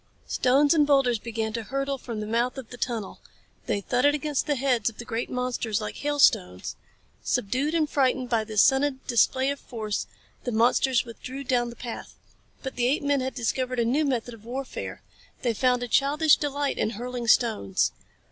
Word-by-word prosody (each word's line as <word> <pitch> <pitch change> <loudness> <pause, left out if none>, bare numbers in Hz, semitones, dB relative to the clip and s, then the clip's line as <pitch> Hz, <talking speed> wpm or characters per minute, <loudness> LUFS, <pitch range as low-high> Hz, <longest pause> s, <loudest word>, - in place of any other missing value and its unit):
Stones 280 +4 +3
and 300 -3 +4
boulders 270 -5 +3
began 220 -1 -3
to 230 - -2
hurtle 275 +3 -2
from 230 -4 -5
the - - -3
mouth 235 +4 0
of 260 -4 -8
the 245 - -8
tunnel. 230 -5 -3 0.5
They 200 - 0
thudded 255 +8 +2
against 300 -1 -1
the 295 - +2
heads 250 -4 +1
of 225 - -16
the 240 - -7
great 230 +1 -3
monsters 250 -4 -1
like 215 - -5
hailstones. 270 - +2 0.5
Subdued 270 +10 0
and 315 -2 +2
frightened 260 -3 +1
by 230 -2 +1
this 215 -1 +3
sudden 270 0 +2
display 260 +3 +2
of 280 - -5
force, 215 -4 -4 0.4
the 245 - -2
monsters 240 +2 +3
withdrew 255 +4 -7
down 245 -2 +1
the 235 - -10
path. 235 -2 -7 0.5
But 265 - -5
the 245 0 +2
apemen 285 0 +1
had 260 +1 -3
discovered 255 +1 -1
a 235 - +2
new 270 +7 +2
method 245 -4 -1
of 220 -2 -13
warfare. 255 +3 -6 0.4
They 240 -2 +1
found 250 +2 +2
a - - -3
childish 290 +5 +4
delight 285 -1 -2
in - - +1
hurling 245 0 -4
stones. 220 - +2
250 Hz, 185 wpm, -26 LUFS, 230-275 Hz, 0.5 s, and